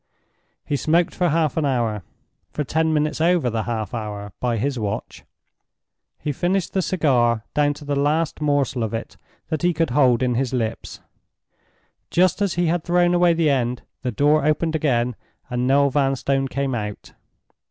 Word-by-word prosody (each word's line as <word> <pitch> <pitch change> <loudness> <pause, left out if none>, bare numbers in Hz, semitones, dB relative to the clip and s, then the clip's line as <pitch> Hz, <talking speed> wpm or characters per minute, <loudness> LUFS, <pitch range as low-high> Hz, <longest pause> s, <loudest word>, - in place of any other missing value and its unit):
He 145 - -1
smoked 165 +4 +2
for 175 -1 +1
half 160 0 +1
an 160 - +2
hour—for 120 - -4
ten 160 +3 0
minutes 155 0 0
over 170 -7 +2
the 110 -1 -2
half 110 -1 -3
hour, 105 -3 -5
by 120 -2 0
his 130 +3 -1
watch. 105 -2 -4 0.9
He 150 - -3
finished 180 +5 -1
the 190 - +1
cigar 120 -11 +1
down 145 -1 +2
to 145 - -11
the 145 0 -1
last 150 +3 0
morsel 145 -4 +1
of 110 0 -2
it 115 - -6 0.3
that 155 -2 -2
he 175 -1 +2
could 165 -4 0
hold 125 -2 +3
in 125 -1 +1
his 130 +1 -1
lips. 115 -3 -3 1.1
Just 185 +3 +2
as 200 -3 +1
he 175 0 +1
had 170 0 0
thrown 175 0 +2
away 175 -1 +4
the 165 -3 +2
end, 125 -2 -1 0.2
the 130 - -2
door 145 +6 +3
opened 155 +2 +1
again 125 -6 +1 0.4
and 125 0 0
Noel 140 +1 +4
Vanstone 135 0 +1
came 135 0 -2
out. 105 -3 -5
140 Hz, 170 wpm, -22 LUFS, 120-160 Hz, 1.1 s, away